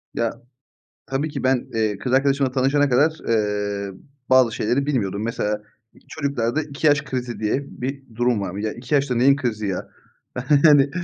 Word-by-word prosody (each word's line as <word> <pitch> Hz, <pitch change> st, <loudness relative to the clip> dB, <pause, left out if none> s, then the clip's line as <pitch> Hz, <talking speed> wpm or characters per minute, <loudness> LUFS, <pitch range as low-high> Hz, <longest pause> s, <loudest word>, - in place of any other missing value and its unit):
Ya, 115 Hz, -1 st, 0 dB, 0.7 s
tabii 140 Hz, +4 st, -1 dB
ki 145 Hz, -, -5 dB
ben, 130 Hz, -1 st, +1 dB
eee, 110 Hz, -3 st, 0 dB
kız 125 Hz, +4 st, -3 dB
arkadaşımla 135 Hz, 0 st, +2 dB
tanışana 135 Hz, +2 st, +2 dB
kadar, 145 Hz, +6 st, +4 dB, 0.2 s
eee, 105 Hz, -2 st, -1 dB, 0.4 s
bazı 130 Hz, -3 st, +5 dB
şeyleri 125 Hz, +6 st, 0 dB
bilmiyordum. 105 Hz, -8 st, -1 dB
Mesela, 105 Hz, -2 st, -2 dB, 0.3 s
i -, -, -20 dB
çocuklarda 140 Hz, -2 st, -1 dB
2 150 Hz, +1 st, -1 dB
yaş 145 Hz, 0 st, +4 dB
krizi 125 Hz, -4 st, -4 dB
diye 110 Hz, +6 st, 0 dB
bir 135 Hz, +2 st, -5 dB
durum 120 Hz, -2 st, +1 dB
var. 95 Hz, -1 st, -4 dB
Ya, 105 Hz, +1 st, -2 dB
2 125 Hz, +5 st, -6 dB
yaşta 140 Hz, -3 st, +1 dB
neyin 135 Hz, +4 st, +5 dB
krizi 115 Hz, -7 st, -2 dB
ya, 95 Hz, -2 st, -4 dB, 0.8 s
hani, 145 Hz, -3 st, +6 dB
125 Hz, 165 wpm, -22 LUFS, 110-140 Hz, 0.8 s, hani